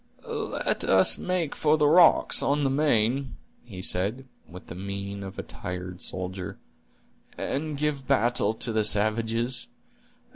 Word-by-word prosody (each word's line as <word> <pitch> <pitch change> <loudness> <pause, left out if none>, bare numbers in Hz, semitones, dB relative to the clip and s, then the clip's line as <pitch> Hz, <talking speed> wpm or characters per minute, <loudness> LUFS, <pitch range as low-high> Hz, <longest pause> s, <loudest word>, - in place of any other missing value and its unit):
"Let - - -2
us 95 0 +5
make 180 -5 -2
for 155 0 +2
the 150 - +2
rocks 165 +2 +5
on 145 +1 0
the 135 - +1
main," 135 -2 +1 0.3
he 95 -6 -9
said, 105 +11 0 0.2
with 90 +1 -11
the - - -9
mien 100 +2 -6
of 95 -1 -8
a - - -4
tired 90 0 -7
soldier, 90 0 -4 0.8
"and 150 +1 -3
give 145 -2 -2
battle 115 0 +1
to 115 - -2
the 110 -1 +1
savages. 115 +4 +1
115 Hz, 140 wpm, -26 LUFS, 100-140 Hz, 0.8 s, us